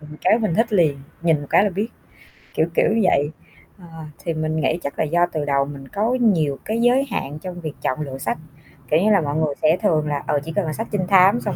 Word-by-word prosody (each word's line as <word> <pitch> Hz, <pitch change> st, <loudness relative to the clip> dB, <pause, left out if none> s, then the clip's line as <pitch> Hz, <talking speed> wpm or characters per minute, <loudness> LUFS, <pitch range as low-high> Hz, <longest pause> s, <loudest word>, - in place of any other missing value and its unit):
ừm, 150 Hz, 0 st, -13 dB
cái 220 Hz, -, +4 dB
mình 215 Hz, -7 st, -1 dB
thích 225 Hz, +4 st, +1 dB
liền, 160 Hz, -8 st, +3 dB, 0.3 s
nhìn 165 Hz, -3 st, +2 dB
một 145 Hz, -, -8 dB
cái 205 Hz, -, +5 dB
là 205 Hz, -, +1 dB
biết, 200 Hz, +5 st, -2 dB, 0.7 s
kiểu 160 Hz, -, +2 dB
kiểu -, -, +3 dB
như 225 Hz, +1 st, +2 dB
vậy. 145 Hz, -5 st, +2 dB, 0.5 s
Ờ, 180 Hz, -, -13 dB, 0.4 s
thì 165 Hz, -, -2 dB
mình 155 Hz, 0 st, -2 dB
nghĩ 170 Hz, -, 0 dB
chắc 140 Hz, -, -5 dB
là -, -, +2 dB
do 175 Hz, +3 st, +2 dB
từ 155 Hz, -2 st, -2 dB
đầu 140 Hz, -1 st, +1 dB
mình 140 Hz, -1 st, -9 dB
có 220 Hz, -, 0 dB
nhiều 160 Hz, -11 st, +2 dB
cái 225 Hz, +2 st, -1 dB
giới 250 Hz, +3 st, +3 dB
hạn 145 Hz, +2 st, -4 dB
trong 180 Hz, +1 st, -7 dB
việc 155 Hz, -3 st, -5 dB
chọn 130 Hz, -, -1 dB
lựa 135 Hz, -3 st, -5 dB
sách, -, -, -2 dB, 0.5 s
kiểu 155 Hz, -, +5 dB
như 215 Hz, +3 st, +3 dB
là, 200 Hz, -3 st, +4 dB
mọi 145 Hz, -1 st, -2 dB
người 155 Hz, -2 st, 0 dB
sẽ 155 Hz, +3 st, +4 dB
thường 155 Hz, -7 st, +1 dB
là, 145 Hz, -1 st, -2 dB
ờ, 145 Hz, -, +1 dB
chỉ 160 Hz, -, -6 dB
cần 205 Hz, -, +1 dB
là 155 Hz, -, -3 dB
sách 225 Hz, +6 st, -4 dB
trinh 190 Hz, -4 st, -1 dB
thám 195 Hz, +4 st, +5 dB
xong -, -, -3 dB
165 Hz, 260 wpm, -21 LUFS, 150-205 Hz, 0.7 s, cái